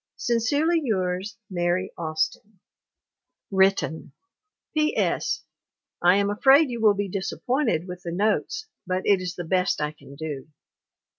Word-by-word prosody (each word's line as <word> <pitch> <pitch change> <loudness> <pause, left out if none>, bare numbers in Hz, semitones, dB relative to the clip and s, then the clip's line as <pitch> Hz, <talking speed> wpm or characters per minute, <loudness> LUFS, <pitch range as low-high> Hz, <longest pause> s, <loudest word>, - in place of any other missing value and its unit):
Sincerely 285 +9 +1
yours 190 -1 -1
MARY 175 0 -1
AUSTIN. 170 +5 -3 0.9
[Written] 190 -4 +1 0.6
P. 305 -1 +1
S. - - 0 0.6
I 180 +2 +6
am 200 0 +2
afraid 270 +6 +5
you 235 -2 -4
will 210 -2 +5
be 200 0 -1
disappointed 195 - -1
with 180 0 -7
the 170 - -5
notes 215 - 0 0.2
but 185 0 -1
it 200 -2 +4
is 180 -1 -4
the 175 - -4
best 180 +1 +1
I 150 0 -1
can 140 -2 -15
do. 145 -2 -6
190 Hz, 135 wpm, -25 LUFS, 175-225 Hz, 0.9 s, I